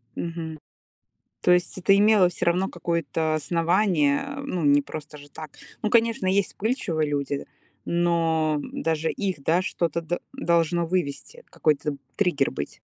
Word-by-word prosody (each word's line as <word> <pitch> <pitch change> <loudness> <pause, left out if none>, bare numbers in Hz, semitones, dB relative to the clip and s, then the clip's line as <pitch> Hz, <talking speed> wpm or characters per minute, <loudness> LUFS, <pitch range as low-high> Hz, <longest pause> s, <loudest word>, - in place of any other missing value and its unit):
Мгм. 165 -2 -5 0.8
То - - +3
есть 180 +1 +2
это 195 +2 +4
имело 205 -3 +5
всё 180 +1 -4
равно 180 +3 +2
какое-то 165 -1 -1
основание, 165 -1 +2 0.2
э, - - -4
ну, 185 - -3
не 145 0 +5
просто 150 +1 -8
же 145 0 -14
так. 155 0 -9 0.3
Ну, 215 - 0
конечно, 230 -2 +2
есть 195 +1 +2
вспыльчивые 195 - -1
люди, 140 -1 -2 0.4
но, 165 -3 +1
м, - - -6
даже 160 0 0
их, 190 -8 -3
да, 170 +5 +3
что-то 170 -2 -1
д 170 +2 -3
должно 170 - +1
вывести, 180 - -3
какой-то 150 -1 0 0.2
триггер 175 -9 +2
быть. 70 - -6
170 Hz, 150 wpm, -25 LUFS, 155-185 Hz, 0.8 s, имело